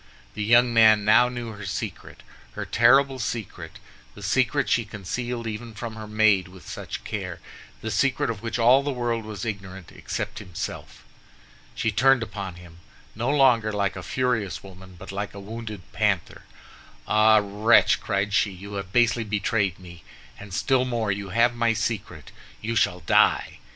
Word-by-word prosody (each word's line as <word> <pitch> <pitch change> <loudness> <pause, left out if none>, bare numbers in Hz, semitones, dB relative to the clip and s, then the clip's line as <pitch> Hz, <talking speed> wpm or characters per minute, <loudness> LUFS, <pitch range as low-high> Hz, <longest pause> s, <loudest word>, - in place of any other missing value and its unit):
The 105 - -4
young 120 +2 +4
man 110 -2 +6
now 120 +3 +5
knew 120 -2 -6
her 105 -1 -9
secret, 95 - -6 0.3
her - - -5
terrible 135 +3 +4
secret—the 105 - -7
secret - - +1
she 115 - +2
concealed 115 +4 -5
even 110 +1 -6
from 115 +1 -6
her 110 -1 -8
maid 105 -3 +3
with 95 0 -15
such - - -7
care, - - -5 0.4
the 110 - -4
secret 125 +2 +1
of 105 -3 -7
which 115 0 -3
all 120 +3 +5
the 145 - -3
world 120 -4 -2
was 110 +1 -6
ignorant, 95 -4 -6
except - - -5
himself. 90 -6 -7 0.7
She 115 - 0
turned 130 +3 +4
upon 100 -5 -6
him, 85 -1 -14 0.3
no 115 +4 -2
longer 125 -6 +4
like 100 -1 -1
a - - -6
furious 125 -7 -1
woman, 95 -1 -13
but 95 +3 -9
like 100 +1 -5
a - - -7
wounded 110 0 -7
panther. - - -1 0.6
"Ah, 110 0 +5
wretch!" 105 +3 +4
cried 100 0 -1
she, 105 - +3
"you 100 +2 -10
have 100 -2 -5
basely 120 +1 +3
betrayed 105 -2 -1
me, 85 -3 -13 0.4
and 105 -1 -11
still 130 +7 +1
more, 120 -4 -1
you 100 0 -4
have 115 +5 +3
my 115 -1 +1
secret! 110 -1 -4 0.3
You 115 +2 -3
shall 90 -5 +1
die." 80 - +2
110 Hz, 165 wpm, -25 LUFS, 100-120 Hz, 0.7 s, man